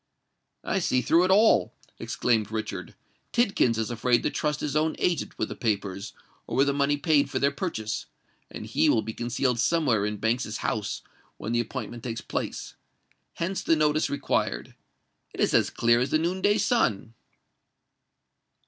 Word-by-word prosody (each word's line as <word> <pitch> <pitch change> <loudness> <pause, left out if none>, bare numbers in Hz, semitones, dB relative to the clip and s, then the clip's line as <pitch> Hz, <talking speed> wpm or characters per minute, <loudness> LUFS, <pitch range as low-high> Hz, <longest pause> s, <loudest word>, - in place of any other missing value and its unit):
"I - - 0
see 125 -1 +1
through 165 +8 +4
it - - -1
all!" 195 - +4 0.2
exclaimed 110 -3 0
Richard. 110 -1 -5 0.4
"Tidkins 195 - +2
is 110 0 -2
afraid 120 +1 +2
to - - 0
trust 150 -1 -1
his 145 -1 -2
own 155 +1 +1
agent 175 -3 -1
with 110 - -2
the - - -6
papers 100 -3 -2 0.3
or - - -3
with 135 - +5
the 140 - +1
money 140 +1 +1
paid 145 -1 +2
for - - -2
their 140 0 +2
purchase; 140 - -4 0.4
and - - -8
he - - +2
will 110 - +3
be 110 - -5
concealed 120 +1 -1
somewhere 125 -7 +2
in 105 0 -3
Banks's 110 0 -1
house 105 0 -2 0.3
when 110 - -5
the 120 - +1
appointment 120 0 -5
takes 115 -2 -4
place. - - -4 0.6
Hence 185 +3 -2
the 165 - +3
notice 155 0 +2
required. 65 - -1 0.6
It - - -11
is - - +2
as - - +4
clear 120 0 +3
as 125 - 0
the - - +3
noon 175 +4 -1
day 205 +2 +3
sun." 115 - +1
125 Hz, 170 wpm, -26 LUFS, 110-155 Hz, 0.6 s, with